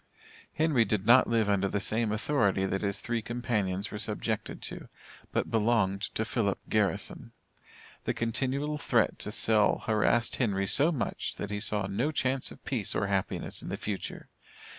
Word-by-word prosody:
Henry 155 Hz, -7 st, +3 dB
did 105 Hz, -3 st, -1 dB
not 120 Hz, +3 st, +7 dB
live 115 Hz, -2 st, +2 dB
under 100 Hz, -1 st, +2 dB
the 100 Hz, -, -1 dB
same 110 Hz, +2 st, 0 dB
authority 105 Hz, -4 st, +1 dB
that 95 Hz, 0 st, -1 dB
his 100 Hz, -1 st, -1 dB
three 120 Hz, -1 st, -2 dB
companions 105 Hz, -5 st, -2 dB
were 105 Hz, -, -5 dB
subjected -, -, -2 dB
to, -, -, -6 dB, 0.4 s
but -, -, -1 dB
belonged 105 Hz, -4 st, +2 dB
to 110 Hz, -, 0 dB
Philip 105 Hz, -3 st, 0 dB
Garrison. 105 Hz, -2 st, -1 dB, 0.7 s
The -, -, -1 dB
continual 135 Hz, +6 st, -1 dB
threat 120 Hz, -5 st, +1 dB
to 105 Hz, -, -3 dB
sell 110 Hz, -1 st, +3 dB
harassed 115 Hz, +1 st, +2 dB
Henry 100 Hz, -6 st, +1 dB
so 145 Hz, -, +4 dB
much, 135 Hz, -8 st, -3 dB
that 105 Hz, -, -5 dB
he 105 Hz, -, -2 dB
saw 105 Hz, -2 st, 0 dB
no 115 Hz, +10 st, -1 dB
chance 130 Hz, -3 st, 0 dB
of -, -, -14 dB
peace 115 Hz, -8 st, -1 dB
or -, -, +1 dB
happiness 100 Hz, -2 st, -1 dB
in -, -, -7 dB
the -, -, -3 dB
future. 100 Hz, -2 st, -5 dB
110 Hz, 165 wpm, -29 LUFS, 100-120 Hz, 0.7 s, not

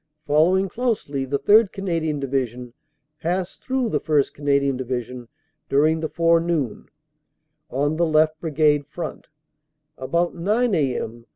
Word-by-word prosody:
Following 175 Hz, +6 st, +3 dB
closely, 200 Hz, -, -2 dB
the 140 Hz, +2 st, -1 dB
3rd. 205 Hz, +8 st, +4 dB
Canadian 165 Hz, -6 st, -2 dB
Division 125 Hz, -3 st, -3 dB, 0.5 s
passed 180 Hz, +2 st, -3 dB
through 260 Hz, -3 st, -1 dB
the -, -, 0 dB
1st. 150 Hz, -3 st, +1 dB
Canadian 140 Hz, -1 st, +1 dB
Division 125 Hz, -1 st, -5 dB, 0.4 s
during 155 Hz, +3 st, +3 dB
the 160 Hz, -1 st, -3 dB
forenoon, 165 Hz, -7 st, +1 dB, 0.8 s
on 145 Hz, +4 st, -1 dB
the 170 Hz, -, +2 dB
left 155 Hz, 0 st, +2 dB
Brigade 150 Hz, -2 st, +1 dB
front, 175 Hz, -, -7 dB, 0.7 s
about 170 Hz, +7 st, 0 dB
9 215 Hz, +6 st, 0 dB
a.m. 120 Hz, -7 st, -2 dB
155 Hz, 120 wpm, -22 LUFS, 135-175 Hz, 0.8 s, 3rd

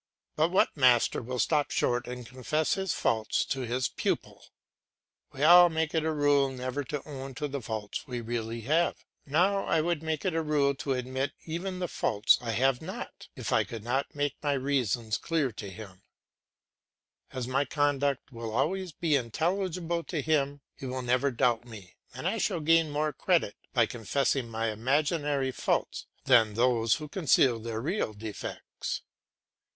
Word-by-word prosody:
But 155 Hz, +2 st, +3 dB
what 185 Hz, -, +2 dB
master 125 Hz, -5 st, +4 dB
will 125 Hz, +2 st, -5 dB
stop 150 Hz, +3 st, +2 dB
short 120 Hz, 0 st, 0 dB
and 125 Hz, 0 st, -6 dB
confess 130 Hz, +6 st, -1 dB
his 190 Hz, -2 st, -1 dB
faults 110 Hz, -1 st, 0 dB
to 135 Hz, -, -2 dB
his 125 Hz, +1 st, 0 dB
pupil? -, -, -3 dB, 0.8 s
We 135 Hz, -, -4 dB
all 175 Hz, +2 st, +9 dB
make 160 Hz, -1 st, -1 dB
it 160 Hz, -2 st, +1 dB
a 160 Hz, -, +1 dB
rule 145 Hz, -2 st, +3 dB
never 130 Hz, +2 st, -4 dB
to 145 Hz, +2 st, -5 dB
own 135 Hz, -2 st, -7 dB
to 150 Hz, +2 st, -2 dB
the 140 Hz, -1 st, -4 dB
faults 110 Hz, 0 st, -5 dB
we 125 Hz, -2 st, -4 dB
really 115 Hz, 0 st, -4 dB
have. 155 Hz, +9 st, +1 dB, 0.2 s
Now 185 Hz, +7 st, +2 dB
I 165 Hz, -, +2 dB
would 165 Hz, 0 st, 0 dB
make 160 Hz, 0 st, -3 dB
it 185 Hz, -, +1 dB
a 165 Hz, -, +1 dB
rule 150 Hz, -3 st, +2 dB
to 135 Hz, 0 st, -2 dB
admit 130 Hz, +2 st, -2 dB
even 180 Hz, +3 st, -4 dB
the 180 Hz, -1 st, -2 dB
faults 105 Hz, -8 st, +2 dB
I 120 Hz, -, -5 dB
have 130 Hz, +1 st, +2 dB
not, -, -, -7 dB
if -, -, -3 dB
I -, -, +4 dB
could 115 Hz, -3 st, -8 dB
not 130 Hz, +5 st, -1 dB
make 145 Hz, -1 st, -1 dB
my 145 Hz, -1 st, +1 dB
reasons 125 Hz, -5 st, 0 dB
clear 155 Hz, -6 st, 0 dB
to 105 Hz, -2 st, -7 dB
him; 95 Hz, -1 st, -11 dB, 1.3 s
as 130 Hz, -2 st, -4 dB
my 135 Hz, +2 st, +1 dB
conduct 145 Hz, -2 st, 0 dB
will 115 Hz, -2 st, -6 dB
always 180 Hz, +7 st, 0 dB
be 155 Hz, 0 st, +1 dB
intelligible 170 Hz, -, -1 dB
to 165 Hz, -, -3 dB
him, 145 Hz, -2 st, 0 dB
he 135 Hz, -, -8 dB
will 130 Hz, 0 st, -3 dB
never 125 Hz, +3 st, +2 dB
doubt 120 Hz, -2 st, +1 dB
me 105 Hz, -6 st, -11 dB, 0.2 s
and 130 Hz, +8 st, -4 dB
I 220 Hz, +4 st, 0 dB
shall 185 Hz, -5 st, 0 dB
gain 165 Hz, +1 st, +4 dB
more 150 Hz, +1 st, -1 dB
credit 170 Hz, -, +1 dB, 0.2 s
by 120 Hz, -4 st, +4 dB
confessing 120 Hz, +2 st, -1 dB
my 115 Hz, 0 st, -1 dB
imaginary 140 Hz, +3 st, 0 dB
faults -, -, -1 dB, 0.2 s
than 115 Hz, -5 st, +5 dB
those 115 Hz, -1 st, +3 dB
who 155 Hz, -, -6 dB
conceal 140 Hz, -7 st, +3 dB
their 115 Hz, 0 st, -4 dB
real 155 Hz, -, -1 dB
defects. 105 Hz, 0 st, -6 dB
135 Hz, 170 wpm, -29 LUFS, 120-155 Hz, 1.3 s, all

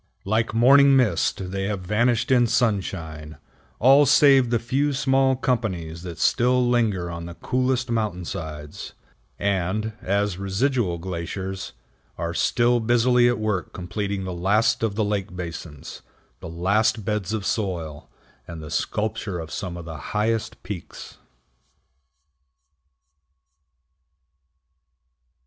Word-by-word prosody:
Like 110 Hz, +3 st, +1 dB
morning 135 Hz, +5 st, +6 dB
mist 100 Hz, -6 st, +1 dB
they 95 Hz, 0 st, -2 dB
have 100 Hz, -2 st, -2 dB
vanished 115 Hz, +7 st, +1 dB
in 120 Hz, -2 st, +5 dB
sunshine, 95 Hz, -, -2 dB, 0.4 s
all 135 Hz, +4 st, +6 dB
save 135 Hz, -3 st, +5 dB
the 120 Hz, -, +2 dB
few 135 Hz, +5 st, 0 dB
small 135 Hz, 0 st, +2 dB
companies 95 Hz, -, -2 dB
that 85 Hz, -2 st, -7 dB
still 125 Hz, +7 st, +2 dB
linger 105 Hz, -8 st, +1 dB
on 85 Hz, 0 st, -6 dB
the 85 Hz, -, -9 dB
coolest 125 Hz, +1 st, -1 dB
mountainsides, 85 Hz, -8 st, -4 dB, 0.4 s
and, 100 Hz, +3 st, -1 dB
as 100 Hz, -1 st, -1 dB
residual 100 Hz, -1 st, 0 dB
glaciers, 95 Hz, +2 st, -5 dB, 0.4 s
are 85 Hz, 0 st, -3 dB
still 120 Hz, +8 st, +2 dB
busily 120 Hz, +1 st, +3 dB
at 120 Hz, -, 0 dB
work 105 Hz, -5 st, -2 dB
completing 95 Hz, +2 st, -4 dB
the 95 Hz, -1 st, -4 dB
last 100 Hz, +6 st, +2 dB
of 110 Hz, -3 st, -1 dB
the 110 Hz, -1 st, +1 dB
lake 100 Hz, -3 st, -3 dB
basins, 80 Hz, -4 st, -7 dB, 0.4 s
the -, -, -8 dB
last 100 Hz, +5 st, +1 dB
beds 105 Hz, -2 st, -2 dB
of 110 Hz, -3 st, -3 dB
soil, 85 Hz, -8 st, -3 dB, 0.4 s
and 85 Hz, -1 st, -8 dB
the 75 Hz, -1 st, -9 dB
sculpture 105 Hz, -3 st, -2 dB
of 80 Hz, -2 st, -7 dB
some 90 Hz, +1 st, -5 dB
of 85 Hz, -, -8 dB
the 80 Hz, -2 st, -7 dB
highest 110 Hz, +7 st, -2 dB
peaks. 95 Hz, -3 st, -8 dB
100 Hz, 120 wpm, -24 LUFS, 90-120 Hz, 0.4 s, morning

